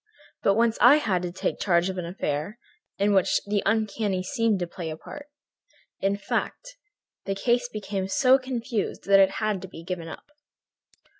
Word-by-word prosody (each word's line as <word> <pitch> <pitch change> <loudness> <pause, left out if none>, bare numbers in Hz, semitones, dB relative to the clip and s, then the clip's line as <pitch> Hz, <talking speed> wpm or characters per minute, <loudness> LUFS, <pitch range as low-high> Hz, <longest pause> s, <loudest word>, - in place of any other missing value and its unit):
But 195 - +3
once 230 0 +2
I 250 +4 +8
had 205 -12 0
to 180 -1 -4
take 180 - -3
charge 175 -2 +2
of 190 -1 -3
an 170 - -4
affair 160 +3 -3 0.4
in 200 +1 +2
which 190 -2 +3
the 205 0 0
uncanny 210 -3 0
seemed 230 -2 +1
to - - 0
play 170 -1 -7
a 155 - -6
part. 290 - -10 0.7
In 195 +1 0
fact, - - -3 0.5
the 195 - -2
case 245 +4 +1
became 200 -3 -4
so 255 +6 +4
confused 240 -4 -3
that 195 0 +6
it 195 0 +5
had 215 -3 -1
to 190 - -7
be 165 -2 -11
given 170 -1 -5
up." - - -9
200 Hz, 175 wpm, -26 LUFS, 185-230 Hz, 0.7 s, I